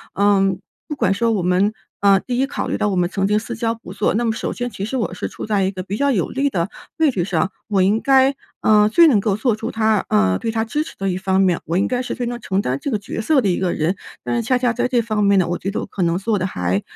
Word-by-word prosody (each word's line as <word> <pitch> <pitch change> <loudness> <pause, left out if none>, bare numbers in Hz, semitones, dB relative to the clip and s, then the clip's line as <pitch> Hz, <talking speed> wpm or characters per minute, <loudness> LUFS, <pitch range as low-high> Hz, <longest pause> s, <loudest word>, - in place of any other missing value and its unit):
嗯， 195 -2 +2 0.3
不 300 - -4
管 215 -8 +1
说 230 +3 +1
我 205 - 0
们， 180 +4 +2 0.3
呃， 200 -1 +5
第 245 +3 -4
一 265 - +3
考 - - -4
虑 - - -1
到 210 - 0
我 195 - -1
们 175 -1 +1
曾 195 +1 -1
经 210 +1 +2
私 230 +1 -6
交 230 0 -1
不 225 -5 -11
错， - - 0
那 235 - 0
么 225 - +2
首 - - -3
先 245 0 -3
其 200 -3 -5
实 225 - -4
我 220 -8 -2
是 - - -4
处 - - -7
在 205 -2 +1
一 190 - 0
个 185 -1 -6
比 200 +2 -4
较 280 +2 +2
有 185 -9 0
利 280 +2 0
的 170 -2 -1 0.3
位 315 - +4
置 180 -7 -1
上， 190 0 0 0.2
我 200 -4 +1
应 205 +4 +3
该， 270 +1 +4 0.3
呃， 210 -1 +5
最 335 +9 +6
能 245 -9 +4
够 200 0 0
做 220 +1 +1
出 225 +2 -5
她， 220 -2 +1
呃 95 -3 +3
对 225 - -3
她 225 0 0
支 295 +7 -2
持 - - -11
的 195 - -1
一 180 - -1
方 190 0 +1
面， 180 -3 +2
我 165 - -2
应 195 - +2
该 250 0 -1
是 - - -4
非 245 -1 -3
常 240 0 -4
承 195 -3 -1
担 130 -5 -1
这 280 - -3
个 215 - 0
角 200 - -6
色 280 +3 +3
的 200 - +1
一 175 - 0
个 185 -2 0
人。 165 +5 0 0.3
但 - - -2
是 235 - +1
恰 255 - +3
恰 245 -2 +2
在 245 0 0
这 245 -2 +1
方 215 -2 -1
面 200 -1 +4
呢， 180 - +1
我 175 - -1
觉 195 - -4
得 - - -3
我 - - -4
可 195 - -6
能 170 0 +1
做 210 +1 0
得 185 - -1
还， 90 - -1
210 Hz, 330 characters per minute, -20 LUFS, 190-235 Hz, 0.3 s, 最